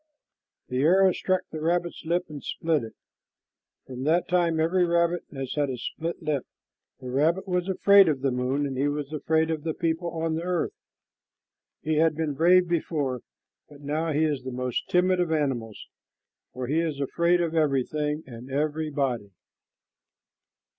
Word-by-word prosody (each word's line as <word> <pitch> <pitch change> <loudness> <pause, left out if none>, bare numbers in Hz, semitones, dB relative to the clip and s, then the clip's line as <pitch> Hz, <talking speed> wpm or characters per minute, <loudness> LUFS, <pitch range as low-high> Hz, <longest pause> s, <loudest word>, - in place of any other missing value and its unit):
The 125 - -1
arrow 185 +5 +5
struck 185 0 0
the 155 - -5
rabbit's 175 +1 -1
lip 175 +2 0
and 150 -2 -9
split 160 -5 0
it. 110 - -9 0.9
From 130 -1 -8
that 165 +3 +2
time 175 -3 +2
every 175 +3 +2
rabbit 170 0 +1
has 135 -2 -5
had 145 -2 0
a 130 - -3
split 165 +8 -5
lip. 150 -4 -1 0.6
The 125 -1 -6
rabbit 160 +9 +1
was 180 0 -1
afraid 200 -1 +6
of 140 -4 -1
the 135 -1 +1
moon, 130 +3 0
and 135 -1 -3
he 140 - +2
was 145 0 -3
afraid 160 +1 +1
of 155 -2 -2
the 160 0 -3
people 165 0 -1
on 165 -1 -2
the 160 - -2
earth. 175 -1 -1 1.1
He 155 0 0
had 160 0 +3
been 155 -2 -1
brave 175 +5 +4
before, 150 -7 -1 0.5
but 145 -1 -15
now 155 +3 -1
he 150 +1 +2
is 145 -4 -1
the 130 - -6
most 125 -1 -3
timid 180 +1 +3
of 175 -2 0
animals, 130 -8 -2 0.7
for 130 0 -5
he 150 +6 +1
is 160 -4 -2
afraid 170 +5 +2
of 170 -2 -1
everything 150 0 0
and 125 0 -10
everybody. 140 -6 -1
155 Hz, 165 wpm, -26 LUFS, 140-170 Hz, 1.1 s, afraid